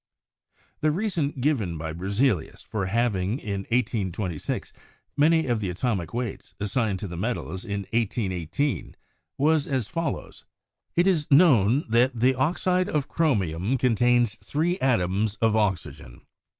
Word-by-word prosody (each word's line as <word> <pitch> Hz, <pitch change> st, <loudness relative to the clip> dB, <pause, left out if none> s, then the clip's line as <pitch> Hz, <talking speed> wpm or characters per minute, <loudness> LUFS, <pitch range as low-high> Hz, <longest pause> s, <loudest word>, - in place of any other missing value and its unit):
The 155 Hz, -, +2 dB
reason 175 Hz, -3 st, 0 dB
given 120 Hz, -, 0 dB
by 80 Hz, 0 st, -4 dB
Berzelius 100 Hz, -, -1 dB
for 100 Hz, -4 st, -3 dB
halving 105 Hz, -1 st, 0 dB
in 100 Hz, -6 st, -4 dB
1S26 100 Hz, -, -2 dB, 0.4 s
many 160 Hz, +2 st, +4 dB
of 120 Hz, -3 st, 0 dB
the 100 Hz, -3 st, -2 dB
atomic 95 Hz, -2 st, -2 dB
weights 120 Hz, -3 st, -5 dB
assigned 105 Hz, 0 st, 0 dB
to 100 Hz, -, -3 dB
the 85 Hz, -, -7 dB
metals 95 Hz, -2 st, -3 dB
in 100 Hz, -3 st, -3 dB
181 95 Hz, -7 st, -1 dB, 0.4 s
8 -, -, -18 dB, 0.4 s
was 150 Hz, +1 st, +2 dB
as 130 Hz, -6 st, -1 dB
follows: 165 Hz, +4 st, -4 dB, 0.5 s
"It 175 Hz, -, +4 dB
is 170 Hz, -6 st, +1 dB
known 135 Hz, -, +5 dB
that 120 Hz, +2 st, +2 dB
the 130 Hz, +3 st, +4 dB
oxide 180 Hz, +7 st, +1 dB
of 145 Hz, -3 st, -1 dB
chromium 105 Hz, -, 0 dB
contains 120 Hz, -2 st, +3 dB
three 170 Hz, +5 st, -1 dB
atoms 105 Hz, -4 st, +1 dB
of 110 Hz, +1 st, +1 dB
oxygen. 95 Hz, -, -2 dB
115 Hz, 135 wpm, -25 LUFS, 95-140 Hz, 0.5 s, known